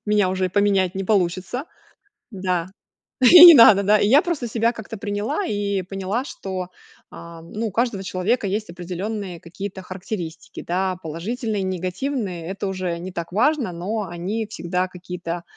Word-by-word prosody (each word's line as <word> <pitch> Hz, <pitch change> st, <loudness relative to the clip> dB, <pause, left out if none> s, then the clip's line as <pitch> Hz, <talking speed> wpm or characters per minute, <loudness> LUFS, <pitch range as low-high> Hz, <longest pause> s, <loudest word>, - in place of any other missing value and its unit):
Меня 210 Hz, -3 st, +2 dB
уже 185 Hz, 0 st, 0 dB
и -, -, -3 dB
поменять 195 Hz, -2 st, +1 dB
не 195 Hz, 0 st, -3 dB
получится. 190 Hz, -, 0 dB, 0.7 s
Да. 185 Hz, -3 st, -2 dB, 0.5 s
И 340 Hz, +7 st, +10 dB
не 340 Hz, -, +12 dB
надо, 215 Hz, -6 st, +8 dB
да. 210 Hz, +2 st, +4 dB
И 205 Hz, -, +2 dB
я 275 Hz, +8 st, +6 dB
просто 330 Hz, -9 st, -3 dB
себя 230 Hz, +1 st, +1 dB
как-то 220 Hz, -1 st, -8 dB
приняла 205 Hz, -, -2 dB
и 200 Hz, -, -1 dB
поняла, 195 Hz, +5 st, -3 dB
что, 185 Hz, -7 st, -6 dB, 0.4 s
а, 170 Hz, -1 st, -11 dB
ну, 210 Hz, +7 st, -4 dB
у -, -, -5 dB
каждого 225 Hz, -3 st, -1 dB
человека 190 Hz, +6 st, -1 dB
есть 210 Hz, +1 st, -2 dB
определенные 180 Hz, +2 st, -5 dB
какие-то 190 Hz, +3 st, -7 dB
характеристики, 180 Hz, -3 st, -7 dB
да. 185 Hz, +1 st, -1 dB
Положительные 210 Hz, +7 st, -3 dB
и -, -, -2 dB
негативные- 185 Hz, 0 st, -3 dB
это 195 Hz, +1 st, -4 dB
уже 185 Hz, -3 st, -3 dB
не 185 Hz, +2 st, -7 dB
так 170 Hz, -1 st, -6 dB
важно, 250 Hz, -, +1 dB
но 195 Hz, +6 st, -3 dB
они 185 Hz, +6 st, -3 dB
всегда 180 Hz, -1 st, -2 dB
какие-то 180 Hz, -1 st, -6 dB
195 Hz, 160 wpm, -22 LUFS, 180-220 Hz, 0.7 s, не